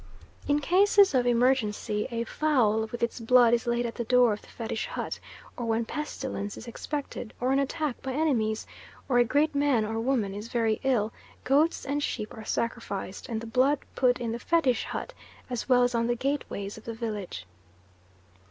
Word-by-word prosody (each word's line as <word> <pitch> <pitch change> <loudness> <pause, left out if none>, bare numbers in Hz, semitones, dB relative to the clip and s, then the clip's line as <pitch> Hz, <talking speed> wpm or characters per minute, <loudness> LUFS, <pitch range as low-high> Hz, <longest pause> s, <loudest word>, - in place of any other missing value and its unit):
In 290 - +3
cases 390 +4 +5
of 250 -2 +2
emergency 235 -4 +1
a 235 -1 -2
fowl 230 -6 +1
with 240 - -4
its 235 - -1
blood 240 0 +5
is 240 0 +1
laid 240 0 +1
at 230 - -3
the 240 - -3
door 245 -1 +4
of 205 - -6
the - - -18
Fetish 225 -1 -4
hut, - - -4 0.4
or 240 - -4
when 225 0 +1
pestilence 265 -8 -4
is 240 - -9
expected, 260 -2 -5
or 250 +2 +1
an 270 - +3
attack 285 -1 -2
by 265 -1 -4
enemies, 240 -8 0 0.4
or 245 -3 +3
a - - +7
great 290 +6 +2
man 280 -6 +2
or 225 +1 -2
woman 225 -5 0
is 205 +3 -6
very 225 -2 0
ill, 235 -5 +1 0.3
goats 295 +5 +2
and 285 +1 -1
sheep 215 -6 -3
are 220 - -8
sacrificed 220 -4 -3
and 225 -2 -2
the - - -7
blood 260 +5 +3 0.2
put 250 -1 +2
in 235 -2 -2
the 235 - -3
Fetish 265 -6 +2
hut - - -5 0.4
as 245 +1 -3
well 250 -1 +6
as 245 0 +1
on 230 0 +1
the 240 - +1
gateways 230 -6 -3
of - - -20
the 230 - -5
village. 210 - -5
240 Hz, 190 wpm, -28 LUFS, 225-270 Hz, 0.4 s, a